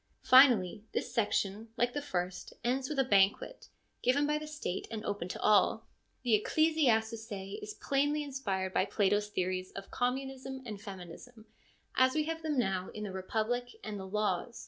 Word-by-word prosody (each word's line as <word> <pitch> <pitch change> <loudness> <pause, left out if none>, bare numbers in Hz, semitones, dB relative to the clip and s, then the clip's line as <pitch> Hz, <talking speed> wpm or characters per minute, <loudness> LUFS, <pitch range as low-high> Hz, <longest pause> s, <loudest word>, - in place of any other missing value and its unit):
Finally, 225 -7 +6
this - - -2
section, 215 -1 0
like 245 0 +1
the 290 - -2
first, 180 -9 -4
ends 260 +2 0
with 300 - -3
a 270 - +4
banquet, 200 - +2 0.3
given 270 +4 +3
by 300 +1 +1
the 305 - -7
State, 300 -12 -4
and 220 -1 -5
open 200 -4 -2
to - - -6
all. 210 +1 +4 0.4
The 215 -4 +3
Ecclesiazusce 225 -10 +1
is 210 0 -7
plainly 290 +2 0
inspired 195 -10 -3
by - - +3
Plato's 205 0 +1
theories 185 -2 -2
of 195 0 -8
communism 265 +1 -3
and 210 -4 -7
feminism 205 +4 -10 0.5
as 260 +1 +4
we 310 - +2
have 325 +1 -4
them 310 -3 -1
now 190 -6 0
in 210 - -5
the 205 - -4
Republic 225 +6 -2
and 210 -2 -5
the 190 - -7
Laws. 210 +2 -1
225 Hz, 170 wpm, -32 LUFS, 195-265 Hz, 0.5 s, Finally